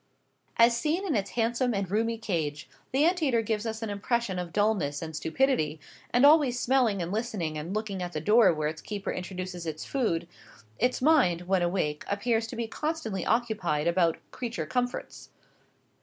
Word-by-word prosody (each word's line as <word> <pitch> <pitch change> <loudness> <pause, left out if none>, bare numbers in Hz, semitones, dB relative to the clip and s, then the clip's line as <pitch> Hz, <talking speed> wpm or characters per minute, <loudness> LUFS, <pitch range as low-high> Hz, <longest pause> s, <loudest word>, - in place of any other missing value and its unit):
As 235 0 +6
seen 310 +10 0
in 335 - 0
its 200 -2 -1
handsome 240 +1 0
and 195 -2 -2
roomy 225 +2 +1
cage, 165 -9 -3 0.2
the 275 +4 +3
ant 355 +1 +2
eater 245 -7 +2
gives 220 0 -2
us 220 0 -4
an 220 - -3
impression 205 -1 -1
of 175 -1 -5
dulness 190 -9 +1
and 160 -1 -6
stupidity; 160 - 0 0.3
and 245 +3 +5
always 290 -5 +5
smelling 240 -8 +2
and 170 - -4
listening 205 -8 -2
and 160 +6 -4
looking 210 -3 -3
at 175 0 -4
the 155 - -2
door 210 +5 +5
where 155 -2 -1
its 155 +1 -5
keeper 205 -2 -4
introduces 180 -1 -5
its 155 -1 -5
food, 195 -12 -1 0.5
its 250 +1 +1
mind, 260 - +4
when 185 +1 +1
awake, 175 -4 -1
appears 225 +2 0
to 240 - -7
be 230 0 -2
constantly 225 - -3
occupied 210 -11 0
about 170 -1 +2
"creature 235 -2 -4
comforts." 245 -1 -3
210 Hz, 175 wpm, -28 LUFS, 175-240 Hz, 0.5 s, As